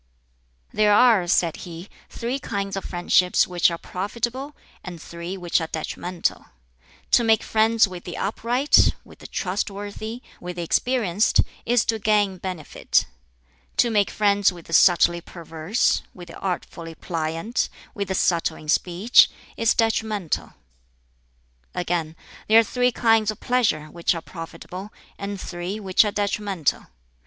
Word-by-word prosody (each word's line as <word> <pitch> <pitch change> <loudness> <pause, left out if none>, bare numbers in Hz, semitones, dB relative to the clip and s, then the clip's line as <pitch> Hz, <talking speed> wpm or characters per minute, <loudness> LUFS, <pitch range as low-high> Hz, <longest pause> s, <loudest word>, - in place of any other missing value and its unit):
"There 210 -1 +4
are," 220 -7 +5
said 170 -2 +2
he, 170 +1 -9 0.2
"three 245 +3 -3
kinds 200 -5 -3
of 195 - -4
friendships 180 +1 +2
which 180 -1 +2
are 170 - -4
profitable, 235 - -4 0.3
and 175 -2 -8
three 170 +3 -7
which 175 -1 0
are 160 - -3
detrimental. 170 +2 -3 0.6
To 240 - +5
make 225 -1 +3
friends 220 0 +3
with 180 -2 -9
the 175 - -7
upright, 240 +7 +2
with - - -17
the - - -10
trustworthy, 205 +4 -4 0.2
with 180 0 -7
the 175 - -4
experienced, 215 +1 +2 0.3
is 240 -1 +3
to 225 -1 0
gain 205 -3 +1
benefit; 180 -5 -1 0.7
to 240 - +3
make 205 -2 +2
friends 205 -2 +2
with 175 -2 -12
the 165 - -9
subtly 170 0 +5
perverse, 165 +5 -1
with 175 -2 -11
the - - -10
artfully 170 -3 -5
pliant, 165 +7 -2 0.2
with 200 -3 -3
the 190 - -2
subtle 170 -3 +1
in 155 - -11
speech, 180 +8 +4 0.3
is 230 0 +2
detrimental." 220 -6 -1 1.2
Again, 170 -3 -2 0.3
"There 220 - +6
are - - +5
three 250 +3 +1
kinds 225 -2 +3
of 215 - -3
pleasure 230 -12 +1
which 170 +3 -1
are 165 - -4
profitable, 175 +4 -9 0.3
and 200 0 -5
three 180 +3 -5
which 190 -1 +3
are 210 - -1
detrimental. 200 -5 -1
195 Hz, 145 wpm, -23 LUFS, 175-220 Hz, 1.2 s, There